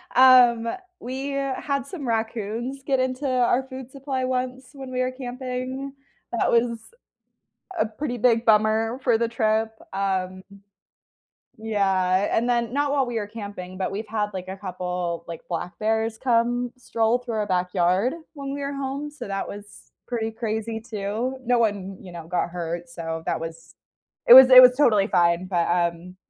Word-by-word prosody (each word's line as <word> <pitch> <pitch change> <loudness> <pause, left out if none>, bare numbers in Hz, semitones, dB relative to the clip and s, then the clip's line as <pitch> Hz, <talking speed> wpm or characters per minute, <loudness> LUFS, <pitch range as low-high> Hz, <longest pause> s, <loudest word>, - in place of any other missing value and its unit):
Um, 250 -3 +7 0.3
we 265 +3 -5
had 275 0 -2
some 300 -2 -7
raccoons 230 +3 -3
get 270 -1 +1
into 255 +2 -1
our 250 0 +2
food 260 -1 -8
supply 270 -1 -3
once 255 0 -3
when 270 -2 -9
we 255 0 -1
were 255 0 0
camping. 255 +1 -5 0.4
That 235 - +1
was 235 0 +2 1.0
a - - +2
pretty 245 +3 -5
big 230 -1 +3
bummer 220 +2 +3
for 240 -3 +4
the 230 +1 0
trip, 220 -1 +1 0.2
um 185 -1 -2 1.2
Yeah, 195 -3 +1
and 235 +2 +1
then 235 -1 0
not 285 0 +1
while 275 -2 +1
we 240 -1 -4
were 205 - -5
camping, 200 -4 -8
but 190 - -2
we've 210 +3 -4
had 210 -1 -1
like 185 -1 -6
a 190 - -5
couple, 180 -3 -4
like, 165 -1 -7
black 175 +1 -5
bears 220 +1 0
come 245 0 +1
stroll 230 -1 0
through 245 -2 -6
our 210 -1 -1
backyard 185 +4 +1 0.2
when 275 -2 -6
we 285 - -4
were 280 0 -3
home, 275 +1 -4
so 295 -7 -9
that 195 0 -3
was 205 0 -11 0.2
pretty 225 -2 -2
crazy 225 0 -3
too. 220 +3 -3
No 245 0 +3
one, 200 -4 -1
you 185 - -11
know, 170 -2 -8
got 175 0 -1
hurt, 170 0 -5
so 165 -1 -5
that 165 - 0
was 165 0 -9 0.5
it 240 - +12
was 260 0 +11
it 255 0 +12
was 250 0 +7
totally 215 -8 +4
fine, 175 -2 +2
but, 175 -3 0
um, 175 +1 -1
225 Hz, 170 wpm, -24 LUFS, 195-255 Hz, 1.2 s, it